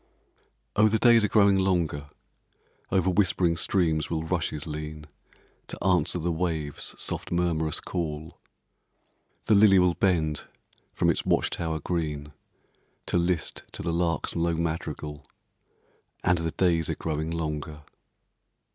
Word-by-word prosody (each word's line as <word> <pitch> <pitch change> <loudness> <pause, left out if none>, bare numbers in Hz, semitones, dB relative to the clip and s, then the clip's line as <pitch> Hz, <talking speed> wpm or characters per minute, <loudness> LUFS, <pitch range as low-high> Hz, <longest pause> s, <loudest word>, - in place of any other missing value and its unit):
Oh, 105 +1 +5
the 110 +1 +2
days 120 -1 +5
are - - +3
growing 100 -2 +4
longer; 85 -6 0 0.8
Over 95 -1 +2
whispering 90 -3 +2
streams 80 -3 +1
will 80 -1 -2
rushes 80 -2 -2
lean, 75 -1 -6 0.6
To - - -7
answer 90 -1 +2
the 85 0 -1
waves' 80 -4 -2
soft - - -2
murmurous 85 -3 0
call; 80 -3 -5 1.1
The 110 - +3
lily 100 -1 +7
will 90 -1 +4
bend 80 -6 0 0.5
from - - +2
its - - -2
watch - - +1
tower 80 -2 -2
green, 75 -3 -3 0.7
To 90 - +1
list 85 -1 -1
to - - -4
the 85 0 -1
lark's 85 -2 -1
low 85 0 +1
madrigal, 80 -3 -4 1.0
And 90 -2 +3
the 80 0 -1
days 85 -1 +1
are - - -1
growing 80 0 -3
longer. 75 -2 -4
85 Hz, 130 wpm, -27 LUFS, 80-90 Hz, 1.1 s, lily